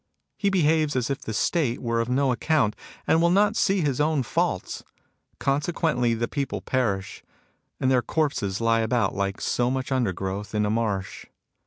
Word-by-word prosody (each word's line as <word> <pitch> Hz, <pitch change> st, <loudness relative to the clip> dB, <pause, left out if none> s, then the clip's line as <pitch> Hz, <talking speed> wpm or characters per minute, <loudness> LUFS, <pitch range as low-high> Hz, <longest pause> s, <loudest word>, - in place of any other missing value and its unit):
He 200 Hz, -, 0 dB
behaves 155 Hz, -5 st, +2 dB
as 125 Hz, +1 st, 0 dB
if 135 Hz, -, -3 dB
the -, -, -5 dB
State 125 Hz, +2 st, 0 dB
were 115 Hz, -1 st, -1 dB
of 115 Hz, +1 st, -1 dB
no 135 Hz, +1 st, +2 dB
account, 125 Hz, -3 st, +1 dB, 0.3 s
and 160 Hz, -, +3 dB
will 170 Hz, -, +4 dB
not 205 Hz, +4 st, +3 dB
see 195 Hz, -4 st, +2 dB
his 145 Hz, -3 st, 0 dB
own 150 Hz, -2 st, +1 dB
faults. -, -, -2 dB, 0.6 s
Consequently, 140 Hz, -4 st, 0 dB
the 115 Hz, +1 st, -1 dB
people 140 Hz, -1 st, -3 dB
perish; 100 Hz, -7 st, -2 dB, 0.6 s
and 130 Hz, -, +2 dB
their 125 Hz, -1 st, +4 dB
corpses 120 Hz, -11 st, -1 dB
lie 115 Hz, 0 st, +2 dB
about 115 Hz, -2 st, +1 dB
like 100 Hz, 0 st, -2 dB
so 120 Hz, 0 st, 0 dB
much 130 Hz, +1 st, -3 dB
undergrowth 100 Hz, -4 st, -2 dB
in 105 Hz, 0 st, +2 dB
a 105 Hz, -, 0 dB
marsh. 105 Hz, -4 st, -2 dB
125 Hz, 170 wpm, -25 LUFS, 110-150 Hz, 0.6 s, will